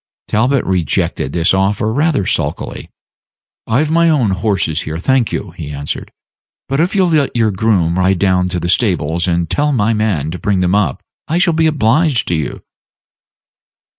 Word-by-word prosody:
Talbot 125 +5 +1
rejected 90 -6 -1
this 85 +3 +1
offer 100 +3 0
rather 145 - +1
sulkily. - - -3 0.8
"I've 145 +7 +1
my 170 0 +3
own 130 -10 +2
horses 95 -5 -1
here, 80 +1 -5
thank 125 +6 +1
you," 100 - -4
he 80 -3 -8
answered. 70 0 -5 0.6
"But 135 +1 -1
if 175 +5 +1
you'll 190 -3 +3
let 150 -6 +1
your 115 -2 +2
groom 95 -4 +1
ride 95 0 +2
down 90 -1 +1
to 90 -1 -2
the 85 - -3
stables 85 -4 0
and 85 -1 0
tell 145 - 0
my 115 -4 +1
man 100 -9 -1
to 90 - -6
bring 100 -2 0
them 90 0 +1
up, 100 -9 0 0.2
I 165 - 0
shall 175 -1 +2
be 160 0 +2
obliged 150 -1 +1
to - - 0
you." 75 -5 -4
105 Hz, 170 wpm, -16 LUFS, 85-135 Hz, 0.8 s, my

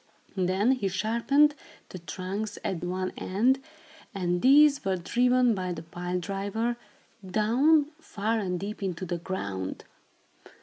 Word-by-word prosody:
Then 190 +5 +2
he 255 -7 0
sharpened 235 +10 +2 0.4
the 185 - -8
trunks 195 +5 -5
at 180 -3 -2
one 185 +1 -2
end, 240 +8 +1 0.6
and 175 -2 -1
these 285 +2 +6
were 190 -1 0
driven, 245 +6 +2
by 185 -3 -3
the 160 -1 -7
pile 175 +2 -4
driver, 200 +6 -2 0.5
down, 240 - +3
far 220 -6 -2
and 180 -4 -2
deep, 205 +3 -6
into 185 -1 -3
the 175 -1 -3
ground. 100 - -4
195 Hz, 130 wpm, -27 LUFS, 180-235 Hz, 0.6 s, these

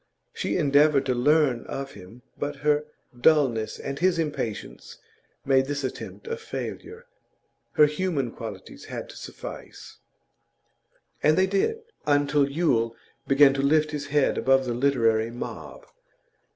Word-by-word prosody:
She - - -2
endeavoured 145 -2 +4
to 130 - +1
learn 135 -1 +2
of 135 0 -5
him, 105 +5 -14
but 145 0 -4
her 150 0 +3 0.3
dulness 120 -5 +2
and 140 0 -5
his 185 -1 +2
impatience 145 -9 -4 0.5
made 135 -1 +3
this 145 0 -3
attempt 130 - -6
a 460 0 -3
failure; 455 0 -7 0.7
her 150 - +6
human 150 -5 -1
qualities 105 -6 -9
had - - -7
to - - -11
suffice. - - -10 1.2
And 155 +1 +4
they 190 - +5
did, 200 - 0 0.2
until 145 -1 +3
Yule 120 -7 +1 0.3
began 135 0 +6
to 135 - -1
lift 155 +2 +2
his 145 -2 -4
head 145 -1 +1
above 135 +2 +3
the 120 - -2
literary 115 -4 +2
mob. 120 - -8
140 Hz, 135 wpm, -25 LUFS, 125-155 Hz, 1.2 s, her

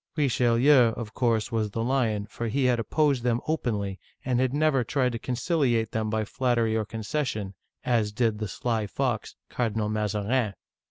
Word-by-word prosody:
Richelieu, 125 -3 +4
of 110 -2 -6
course, 115 -2 +1
was 110 -2 0
the 115 +3 -3
lion, 115 -5 0
for 115 +2 -5
he 130 +4 0
had 125 -2 +3
opposed 140 +2 +1
them 120 -1 +1
openly, 105 -11 -1 0.3
and 125 -2 +1
had 130 -1 +2
never 145 -2 +2
tried 125 +1 0
to 115 - -4
conciliate 125 - 0
them 110 -1 -1
by 110 0 -1
flat 125 +2 0
tery 115 -1 +2
or 110 -1 0
concession, 110 -2 -3 0.3
as 115 -4 +1
did 110 -1 0
the 110 - -2
sly 110 +2 -2
fox, 85 - -2
Cardinal 110 -3 -1
Mazarin 105 +1 0
115 Hz, 170 wpm, -27 LUFS, 110-125 Hz, 0.3 s, Richelieu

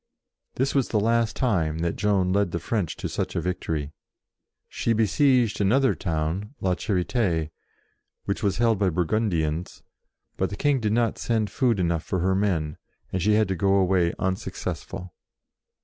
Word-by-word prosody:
This 135 +2 0
was 135 -3 +2
the 110 - +1
last 115 +1 +1
time 85 -11 0
that 85 - -1
Joan 100 -3 +1
led 100 -2 +2
the 85 - -3
French 95 -1 -2
to - - -3
such - - -3
a - - +1
victory. 80 -4 -3 0.8
She 115 - -1
besieged 115 +1 +3
another 130 +7 +3
town, 85 - -3
La 95 -1 +1
Charite", 90 -4 0 0.7
which 100 - -2
was 100 -3 0
held 115 -3 +2
by 100 -2 +3
Burgun 95 +6 0
dians, 80 0 -2 0.5
but 95 - 0
the 100 - -6
King 145 -2 +2
did 110 -3 0
not 115 -1 +1
send 110 -3 0
food 120 -7 +1
enough 85 -2 +1
for 95 - -2
her 95 +2 +1
men, 90 -7 0 0.4
and 95 - 0
she 105 +4 +3
had 110 -1 +3
to 95 - 0
go 95 +2 +2
away 90 -3 +3
unsuccessful. 90 -1 -4
100 Hz, 165 wpm, -25 LUFS, 85-110 Hz, 0.8 s, besieged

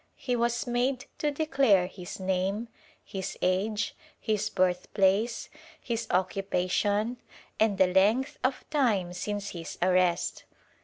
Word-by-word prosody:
He 250 -2 -1
was 235 0 0
made 250 +2 0
to 300 - +1
declare 275 - +3
his 180 0 -8
name, 190 +4 -1 0.4
his 190 -1 -5
age, 200 +4 0 0.2
his 215 -1 0
birth 180 -2 0
place, 200 +4 +2 0.3
his 230 -2 -3
occupation 195 +4 0 0.4
and 215 -3 +3
the 190 - +6
length 205 +9 +2
of 255 0 -1
time 215 - +1
since 205 +2 -3
his 165 -2 -7
arrest. 180 -1 +2
205 Hz, 120 wpm, -28 LUFS, 185-235 Hz, 0.4 s, the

